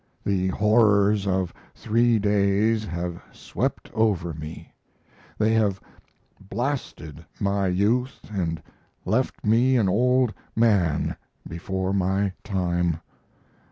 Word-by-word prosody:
The 95 Hz, -2 st, +1 dB
horrors 105 Hz, 0 st, +3 dB
of 95 Hz, -2 st, 0 dB, 0.2 s
three 115 Hz, +1 st, +2 dB
days 105 Hz, +2 st, +2 dB
have 85 Hz, -2 st, -4 dB
swept -, -, -4 dB
over 95 Hz, -7 st, +1 dB
me 75 Hz, +1 st, -9 dB, 0.6 s
they 110 Hz, +1 st, +2 dB
have 105 Hz, -4 st, +1 dB, 0.7 s
blasted 110 Hz, -, -4 dB, 0.2 s
my 100 Hz, -1 st, 0 dB
youth 110 Hz, +8 st, +1 dB
and 85 Hz, -5 st, -2 dB, 0.4 s
left -, -, -1 dB
me 120 Hz, +5 st, +4 dB
an 110 Hz, -5 st, +2 dB
old 125 Hz, +4 st, +2 dB, 0.2 s
man 100 Hz, -9 st, +2 dB, 0.3 s
before 95 Hz, +3 st, -3 dB
my 95 Hz, +1 st, +1 dB
time. 90 Hz, -4 st, -1 dB
100 Hz, 100 wpm, -24 LUFS, 90-110 Hz, 0.7 s, me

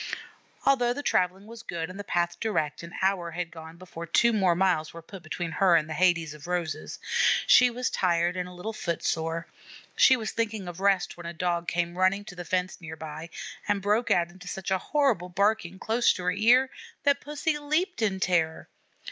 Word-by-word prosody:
Although 245 Hz, -3 st, +3 dB
the 285 Hz, -, -6 dB
travelling 185 Hz, -2 st, +1 dB
was 230 Hz, +1 st, -10 dB
good 170 Hz, -8 st, -4 dB
and 185 Hz, +3 st, -10 dB
the -, -, -4 dB
path 175 Hz, -2 st, -1 dB
direct, 180 Hz, -10 st, -1 dB
an 170 Hz, 0 st, -10 dB
hour 190 Hz, -3 st, +1 dB
had 170 Hz, 0 st, -4 dB
gone 160 Hz, 0 st, -11 dB
before 170 Hz, -2 st, -9 dB
two 235 Hz, +8 st, +4 dB
more 190 Hz, -5 st, +3 dB
miles 175 Hz, -4 st, +1 dB
were 170 Hz, -, -8 dB
put 190 Hz, +2 st, -11 dB
between 165 Hz, +1 st, -4 dB
her 185 Hz, 0 st, +4 dB
and 155 Hz, -2 st, +2 dB
the 160 Hz, -, -4 dB
Hades 170 Hz, -3 st, +2 dB
of 150 Hz, +1 st, -11 dB
roses. 165 Hz, -4 st, -3 dB, 0.5 s
She 250 Hz, 0 st, +7 dB
was 250 Hz, +1 st, -2 dB
tired 175 Hz, -1 st, +1 dB
and 180 Hz, 0 st, -3 dB
a -, -, -11 dB
little 180 Hz, +5 st, -6 dB
foot 170 Hz, -6 st, -3 dB
sore. 165 Hz, +1 st, -1 dB, 0.5 s
She 260 Hz, -, +6 dB
was 220 Hz, -2 st, -4 dB
thinking 220 Hz, -4 st, -2 dB
of 175 Hz, 0 st, -7 dB
rest 195 Hz, -3 st, +1 dB
when 175 Hz, -1 st, -8 dB
a 170 Hz, -, -5 dB
Dog 170 Hz, 0 st, -1 dB
came 175 Hz, +1 st, -1 dB
running 195 Hz, +2 st, +2 dB
to 185 Hz, -, -10 dB
the 175 Hz, -, -6 dB
fence 185 Hz, +1 st, -2 dB
near 160 Hz, -1 st, -7 dB
by, 160 Hz, +1 st, -8 dB, 0.4 s
and 205 Hz, -1 st, +1 dB
broke 210 Hz, +4 st, +1 dB
out 175 Hz, 0 st, +2 dB
into 185 Hz, +1 st, -13 dB
such 190 Hz, +1 st, -5 dB
a 190 Hz, -, +2 dB
horrible 245 Hz, -, +1 dB
barking 200 Hz, -1 st, 0 dB
close 230 Hz, +4 st, +2 dB
to 180 Hz, -, -6 dB
her 180 Hz, -, +2 dB
ear 240 Hz, +7 st, +4 dB, 0.3 s
that 280 Hz, -1 st, +3 dB
Pussy 295 Hz, +1 st, -2 dB
leaped 310 Hz, +3 st, -1 dB
in 200 Hz, -3 st, +1 dB
terror. 165 Hz, -4 st, 0 dB
180 Hz, 205 wpm, -27 LUFS, 170-215 Hz, 0.5 s, She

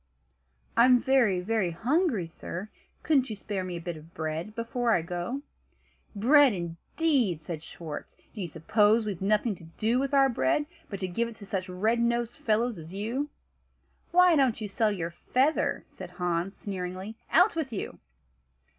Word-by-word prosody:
"I'm 250 Hz, +1 st, +6 dB
very, 240 Hz, -9 st, +3 dB
very 210 Hz, -1 st, 0 dB
hungry, 245 Hz, -, +1 dB
sir; 175 Hz, +4 st, -7 dB, 0.3 s
couldn't 270 Hz, -5 st, +3 dB
you 215 Hz, -, -4 dB
spare 200 Hz, -1 st, -4 dB
me 180 Hz, -1 st, -4 dB
a -, -, -7 dB
bit 170 Hz, -1 st, -5 dB
of 155 Hz, +2 st, -15 dB
bread 160 Hz, +6 st, -4 dB
before 235 Hz, +1 st, -1 dB
I 165 Hz, -, +2 dB
go?" 175 Hz, +11 st, -4 dB, 0.7 s
"Bread 265 Hz, +5 st, +6 dB
indeed!" 185 Hz, -, 0 dB
said 160 Hz, 0 st, -6 dB
Schwartz; 160 Hz, -2 st, -8 dB, 0.2 s
"do 215 Hz, -, -6 dB
you 180 Hz, -, -2 dB
suppose 210 Hz, +8 st, +3 dB
we've 200 Hz, -4 st, -4 dB
nothing 210 Hz, +3 st, +2 dB
to 175 Hz, -, -13 dB
do 220 Hz, +9 st, 0 dB
with 275 Hz, +1 st, 0 dB
our 275 Hz, -1 st, +6 dB
bread 240 Hz, -, +1 dB, 0.2 s
but 200 Hz, -, -5 dB
to 185 Hz, -, -1 dB
give 230 Hz, +7 st, -1 dB
it 230 Hz, -, -9 dB
to 205 Hz, -, -11 dB
such 190 Hz, -1 st, -3 dB
red 215 Hz, +6 st, +1 dB
nosed 235 Hz, 0 st, 0 dB
fellows 225 Hz, -1 st, +1 dB
as 165 Hz, +4 st, -9 dB
you?" 240 Hz, +9 st, -2 dB, 0.8 s
"Why 360 Hz, -1 st, +6 dB
don't 265 Hz, -6 st, +3 dB
you 215 Hz, -, -3 dB
sell 215 Hz, +2 st, +1 dB
your 170 Hz, -4 st, -3 dB
feather?" 260 Hz, -, +1 dB
said -, -, -10 dB
Hans, 180 Hz, +1 st, -2 dB
sneeringly. 190 Hz, +2 st, -5 dB
"Out 360 Hz, +2 st, +5 dB
with 310 Hz, -5 st, -2 dB
you!" 210 Hz, -, -5 dB
210 Hz, 170 wpm, -28 LUFS, 180-245 Hz, 0.8 s, I'm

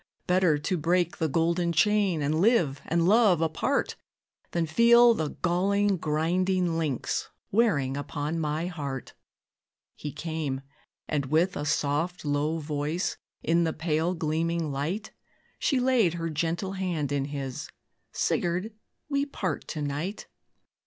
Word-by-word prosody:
Better 180 Hz, -4 st, +3 dB
to 180 Hz, +5 st, -1 dB
break 175 Hz, +2 st, +1 dB
the 160 Hz, -, +1 dB
golden 170 Hz, +3 st, +1 dB
chain, 185 Hz, -1 st, +2 dB
And 155 Hz, +3 st, +1 dB
live 180 Hz, -, +3 dB
and 170 Hz, +1 st, +2 dB
love 210 Hz, -4 st, +5 dB
apart, 160 Hz, -2 st, 0 dB, 0.5 s
Than 170 Hz, -1 st, 0 dB
feel 235 Hz, +7 st, +6 dB
the 160 Hz, -8 st, -2 dB
galling, 195 Hz, +3 st, +2 dB
grinding 175 Hz, +3 st, +1 dB
links 155 Hz, -6 st, -2 dB, 0.2 s
Wearing 160 Hz, -, +2 dB
upon 145 Hz, +3 st, -3 dB
my 155 Hz, +1 st, -1 dB
heart." 145 Hz, -8 st, -5 dB, 0.8 s
He 150 Hz, -, -6 dB
came, 155 Hz, -3 st, -3 dB, 0.5 s
and, 145 Hz, -3 st, -1 dB
with 165 Hz, +6 st, +2 dB
a 145 Hz, -, -3 dB
soft, 150 Hz, +3 st, -1 dB
low 145 Hz, +2 st, 0 dB
voice, 150 Hz, +2 st, -2 dB, 0.3 s
In 170 Hz, +1 st, +3 dB
the 160 Hz, -1 st, 0 dB
pale 160 Hz, +2 st, 0 dB
gleaming 165 Hz, 0 st, -1 dB
light, 165 Hz, +11 st, -3 dB, 0.5 s
She 270 Hz, -, +2 dB
laid 245 Hz, -9 st, +3 dB
her 165 Hz, -1 st, -3 dB
gentle 170 Hz, +5 st, -1 dB
hand 175 Hz, -7 st, -2 dB
in 140 Hz, -1 st, 0 dB
his 140 Hz, -3 st, -5 dB, 0.4 s
"Sigurd, 180 Hz, +5 st, -1 dB, 0.3 s
we 280 Hz, -1 st, +1 dB
part 185 Hz, -, -3 dB
to 150 Hz, -, -4 dB
night. 150 Hz, +8 st, -4 dB
165 Hz, 130 wpm, -27 LUFS, 150-185 Hz, 0.8 s, feel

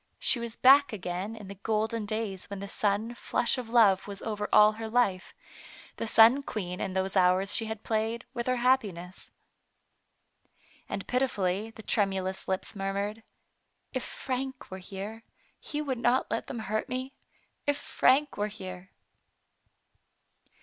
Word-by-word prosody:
She 245 Hz, -, +2 dB
was 235 Hz, -1 st, -4 dB
back 280 Hz, +2 st, +6 dB
again 190 Hz, +1 st, -4 dB
in 210 Hz, -3 st, -10 dB
the 200 Hz, -, -7 dB
golden 220 Hz, 0 st, -1 dB
days 215 Hz, -3 st, -4 dB
when 200 Hz, -1 st, -5 dB
the 200 Hz, -, -6 dB
sun 210 Hz, +3 st, -1 dB
flush 240 Hz, +1 st, 0 dB
of 240 Hz, -3 st, -7 dB
love 215 Hz, -6 st, +4 dB
was 200 Hz, -1 st, -7 dB
over 210 Hz, -2 st, -3 dB
all 210 Hz, 0 st, +7 dB
her 220 Hz, +1 st, -6 dB
life, 220 Hz, -6 st, +1 dB, 0.6 s
and 230 Hz, -, -4 dB
sun 230 Hz, +6 st, +7 dB
queen 180 Hz, -9 st, -5 dB
in 190 Hz, -, -2 dB
those 190 Hz, +1 st, -1 dB
hours 185 Hz, +1 st, +3 dB
she 225 Hz, -, +2 dB
had 220 Hz, -1 st, -5 dB
played 225 Hz, +2 st, -1 dB
with 240 Hz, -1 st, -3 dB
her 255 Hz, -, +2 dB
happiness. 210 Hz, -8 st, 0 dB, 1.6 s
And 200 Hz, -, -4 dB
pitifully 215 Hz, -6 st, 0 dB
the 225 Hz, -1 st, -12 dB
tremulous 190 Hz, -3 st, 0 dB
lips 190 Hz, +3 st, -3 dB
murmured, 200 Hz, +2 st, -2 dB, 0.4 s
" -, -, -46 dB
If 260 Hz, -, -1 dB
Frank 265 Hz, -2 st, -5 dB
were 190 Hz, -, -6 dB
here, 200 Hz, +4 st, -7 dB, 0.4 s
he 300 Hz, 0 st, -4 dB
would 260 Hz, -4 st, -2 dB
not 240 Hz, +2 st, +2 dB
let -, -, -2 dB
them 240 Hz, -, -5 dB
hurt 215 Hz, +1 st, -2 dB
me; 255 Hz, +2 st, -4 dB, 0.5 s
if 290 Hz, 0 st, +2 dB
Frank 285 Hz, +3 st, +2 dB
were 205 Hz, +1 st, 0 dB
here!" 185 Hz, -2 st, -9 dB
215 Hz, 155 wpm, -29 LUFS, 195-240 Hz, 1.6 s, all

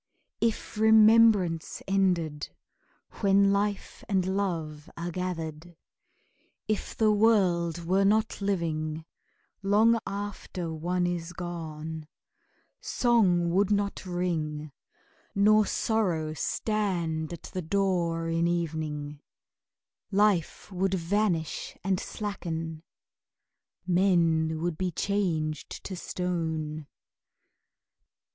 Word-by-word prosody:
If 225 Hz, -2 st, -1 dB
remembrance 220 Hz, -6 st, +5 dB
ended 175 Hz, -6 st, 0 dB, 0.7 s
When 200 Hz, -1 st, +4 dB
life 200 Hz, 0 st, -2 dB
and 190 Hz, -3 st, +2 dB
love 160 Hz, -6 st, -3 dB
are 170 Hz, +1 st, -4 dB
gathered, 170 Hz, -2 st, -5 dB, 0.9 s
If 215 Hz, -1 st, -2 dB
the 220 Hz, -1 st, +4 dB
world 180 Hz, -6 st, +2 dB
were 190 Hz, +3 st, +3 dB
not 215 Hz, +2 st, +2 dB
living 160 Hz, -5 st, -2 dB, 0.6 s
Long 215 Hz, +4 st, +4 dB
after 195 Hz, -4 st, -5 dB
one 175 Hz, +3 st, -1 dB
is 175 Hz, -1 st, -3 dB
gone, 160 Hz, -3 st, -6 dB, 0.7 s
Song 185 Hz, -8 st, +2 dB
would 195 Hz, +2 st, +2 dB
not 200 Hz, -1 st, 0 dB
ring, 160 Hz, -5 st, -2 dB, 0.6 s
nor 210 Hz, +1 st, +5 dB
sorrow 175 Hz, -9 st, 0 dB
Stand 170 Hz, -4 st, -1 dB
at 170 Hz, -, -8 dB
the 185 Hz, -, -2 dB
door 170 Hz, -2 st, 0 dB
in 165 Hz, +1 st, +1 dB
evening; 155 Hz, -4 st, -3 dB, 0.9 s
Life 200 Hz, -3 st, +1 dB
would 190 Hz, +1 st, 0 dB
vanish 175 Hz, -2 st, -1 dB
and 190 Hz, -1 st, +1 dB
slacken, 165 Hz, -6 st, -5 dB, 1.0 s
Men 165 Hz, -4 st, +2 dB
would 170 Hz, -2 st, -2 dB
be 185 Hz, -1 st, 0 dB
changed 165 Hz, -5 st, -2 dB
to 190 Hz, -, -5 dB
stone. 160 Hz, -4 st, -3 dB
175 Hz, 90 wpm, -28 LUFS, 160-200 Hz, 1.0 s, remembrance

